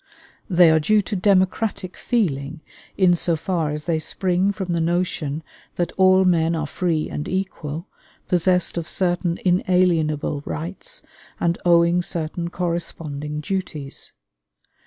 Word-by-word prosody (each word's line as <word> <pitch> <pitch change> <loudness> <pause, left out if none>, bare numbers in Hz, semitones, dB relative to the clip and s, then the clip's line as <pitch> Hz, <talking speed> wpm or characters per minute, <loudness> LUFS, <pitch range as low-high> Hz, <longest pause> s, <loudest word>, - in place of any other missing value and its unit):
They 175 -3 +6
are 160 - +4
due 210 +7 +3
to 205 - -4
democratic 190 0 +1
feeling, 155 - -1 0.4
in 185 -2 +5
so 170 0 0
far 165 -1 -1
as 150 0 -4
they 165 -2 0
spring 185 +4 0
from 185 -3 -3
the 170 - 0
notion 165 -3 -1 0.3
that 175 -1 -1
all 190 0 +4
men 165 -2 +2
are 160 -2 -2
free 160 0 -1
and 150 - -5
equal, 180 -3 -4 0.4
possessed 180 0 +2
of 165 - -6
certain 175 -2 0
inalienable 175 -5 +2
rights 195 - -6 0.4
and 170 0 0
owing 170 0 +4
certain 170 -1 -3
corresponding 160 -4 -4
duties. 155 -5 -4
175 Hz, 130 wpm, -22 LUFS, 160-185 Hz, 0.4 s, They